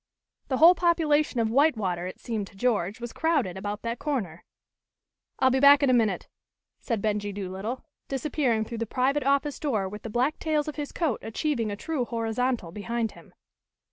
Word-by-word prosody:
The 260 - 0
whole 330 +5 +8
population 315 -6 +2
of 225 -1 +1
White 280 +1 +4
water, 180 -4 -2
it 185 - -8
seemed 220 -4 -3
to 200 - -17
George, 205 -3 0
was 240 -1 -6
crowded 300 - 0
about 205 +2 -5
that 230 +1 -3
corner. 210 - -3 0.9
"I'll 260 0 +4
be 265 - +2
back 285 +1 +7
in 270 - +4
a - - +4
minute," 220 -6 +1 0.5
said 230 -5 -3
Benjie 205 -1 -1
Doolittle, 200 +5 -5 0.2
disappearing 265 -4 0
through 230 0 -6
the 230 - -2
private 270 +5 +1
office 280 +1 +1
door 220 -10 0
with 210 +2 -8
the 225 - -6
black 250 +7 0
tails 305 -2 0
of 305 - -4
his 295 -2 -5
coat 315 -9 -1
achieving 230 0 -1
a 205 - -3
true 265 +4 -2
horizontal 230 -4 -1
behind 225 +3 -2
him. - - -17
240 Hz, 185 wpm, -27 LUFS, 210-285 Hz, 0.9 s, whole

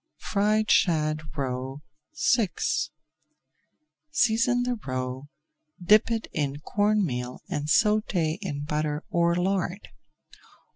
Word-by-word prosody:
FRIED 215 +1 +2
SHAD 155 -3 +2 0.2
ROE 135 +1 -3 0.5
VI 225 -6 +1 1.6
Season 240 - +2
the 250 0 0
roe, 130 +1 -4 0.5
dip 210 +6 +5
it 225 -1 -1
in 145 -2 -2
corn 205 +3 +1
meal 125 -3 -4
and 145 0 -3
sauté 195 -3 +2
in 145 -7 -4
butter 150 0 -2
or 170 0 +2
lard. 185 +1 -1
170 Hz, 100 wpm, -26 LUFS, 145-210 Hz, 1.6 s, dip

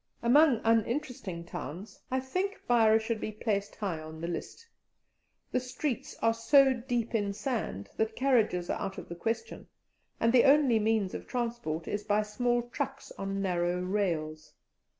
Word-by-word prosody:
Among 265 0 +5
uninteresting 225 - 0
towns, 175 +5 -7
I 260 - +1
think 370 +10 -2
Beira 225 -2 +5
should 220 0 -2
be 215 - -3
placed 205 -2 -2
high 190 -7 -3
on 155 0 -9
the 170 - -4
list; 175 - -6 0.9
the 255 - +2
streets 265 +2 -4
are 225 - +4
so 265 +4 +5
deep 240 -2 -2
in 205 -3 0
sand 210 - -3
that 220 0 0
carriages 225 -9 +2
are - - -2
out 195 -1 -4
of 180 - -8
the 170 - -5
question, 225 - -3 0.5
and 230 +1 +3
the 250 0 +6
only 275 -5 +5
means 215 -3 +1
of - - -6
transport 235 -10 -3
is 205 0 -2
by 210 0 +2
small 240 +3 0
trucks 270 -2 -4
on 195 0 -2
narrow 175 -1 0
rails. 170 -5 -2
220 Hz, 160 wpm, -30 LUFS, 190-250 Hz, 0.9 s, the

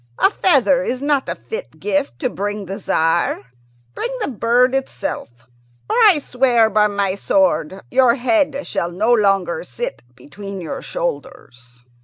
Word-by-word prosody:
A - - +4
feather 280 - +3
is 255 -2 -2
not 285 -1 0
a - - -2
fit 455 +2 -8
gift 290 -8 -1
to 255 - 0
bring 205 +1 -4
to 190 - -6
the 200 - -6
Tzar. 165 -4 +1 0.5
Bring 475 - -3
the 425 - -2
bird 245 +2 +2
itself, 270 - -3 0.6
or, - - -1
I 430 -8 +6
swear 245 -5 +2
by 210 +1 +4
my 200 -2 -1
sword, 190 -2 0
your 250 -2 +4
head 280 +2 0
shall 170 - -2
no 215 +7 +1
longer 195 -6 +1
sit 125 - -6
between 195 +8 -9
your 170 - -6
shoulders!" 125 - -6
235 Hz, 155 wpm, -19 LUFS, 195-280 Hz, 0.6 s, I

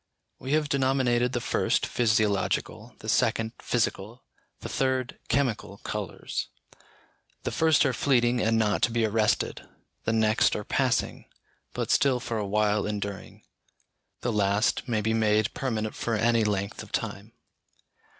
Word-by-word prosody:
We 135 +2 -3
have 155 -1 +2
denominated 130 -3 +1
the 120 - 0
first, - - 0
physiological, 110 -5 0
the - - -9
second, 110 0 +1
physical, 115 0 -2 0.4
the - - -5
third, 130 -1 -1
chemical 120 -7 -1
colours. - - -4 1.0
The - - -2
first 160 -3 +3
are 130 - +1
fleeting 120 -2 +2
and 115 +1 +2
not 105 -3 +1
to 120 - +2
be 115 -1 +1
arrested; 110 0 +1 0.4
the 110 - +1
next 110 -1 +3
are - - -3
passing, - - 0 0.5
but - - -2
still 135 -3 +3
for 115 -2 -3
a 105 - -2
while 105 0 +1
enduring; 100 -1 -5 0.8
the 120 - -1
last 105 +4 +1
may 110 -3 0
be 110 +2 0
made 110 -1 +2
permanent 110 -5 -2
for 115 - -2
any 115 +1 +2
length 100 -2 -2
of - - -12
time. - - -4
115 Hz, 140 wpm, -27 LUFS, 105-125 Hz, 1.0 s, first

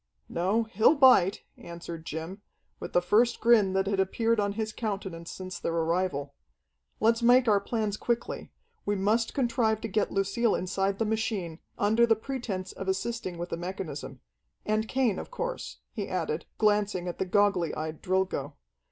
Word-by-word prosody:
"No, 195 +7 +1
he'll 225 +6 +4
bite," 255 - +5 0.2
answered 170 -1 -8
Jim, 165 +6 -5 0.4
with - - -7
the 175 - +3
first 230 +6 +3
grin 220 -5 +4
that 190 0 +1
had 195 0 0
appeared 225 +4 +1
on 200 -1 0
his 220 0 -3
countenance 190 -6 -4
since 185 -1 -7
their 165 - -2
arrival. 165 -4 0 0.7
"Let's 230 +2 +3
make 245 +1 +5
our 205 -2 +5
plans 210 0 -2
quickly. 235 +1 -2 0.3
We 205 - 0
must 215 +4 +1
contrive 235 -4 +1
to - - -3
get 210 0 0
Lucille 200 +4 +1
inside 195 +2 -1
the 225 - 0
machine, 210 -6 -2 0.2
under 220 +3 +3
the 225 - +5
pretense 220 -6 -4
of 195 - -7
assisting 190 -1 -2
with 175 +1 -5
the - - -3
mechanism. 175 -4 -6 0.4
And 215 +1 0
Cain, 250 -6 +1
of - - -7
course," - - -4
he - - -4
added, - - -2
glancing 205 -4 +1
at 175 - -5
the - - 0
goggly 195 -3 +2
eyed 155 0 -5
Drilgo. 190 0 -1
200 Hz, 165 wpm, -28 LUFS, 185-225 Hz, 0.7 s, bite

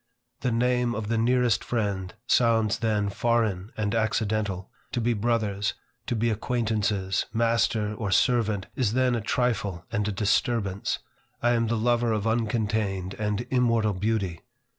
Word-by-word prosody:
The 125 - 0
name 125 +1 +1
of 110 -1 -4
the 115 - +1
nearest 120 -1 +2
friend 100 -5 -2
sounds 115 -3 +3
then 105 -3 0
foreign 110 -3 0
and 105 0 -1
accidental: 110 -4 -1 0.2
to - - 0
be 120 +1 +1
brothers, 105 -2 0 0.3
to 120 - 0
be 115 +1 +1
acquaintances, 105 -4 0
master 115 -2 +1
or 105 -1 -3
servant, 105 -1 +2
is 115 -5 +1
then 130 0 +2
a 120 - 0
trifle 105 -6 -1
and 105 -2 0
a - - 0
disturbance. 100 0 0 0.5
I 120 - +4
am 115 -1 +2
the 115 +1 0
lover 120 0 +2
of 105 -2 -1
uncontained 110 -4 0
and 105 +2 -1
immortal 115 -4 +2
beauty. 100 -3 -1
110 Hz, 145 wpm, -26 LUFS, 100-120 Hz, 0.5 s, I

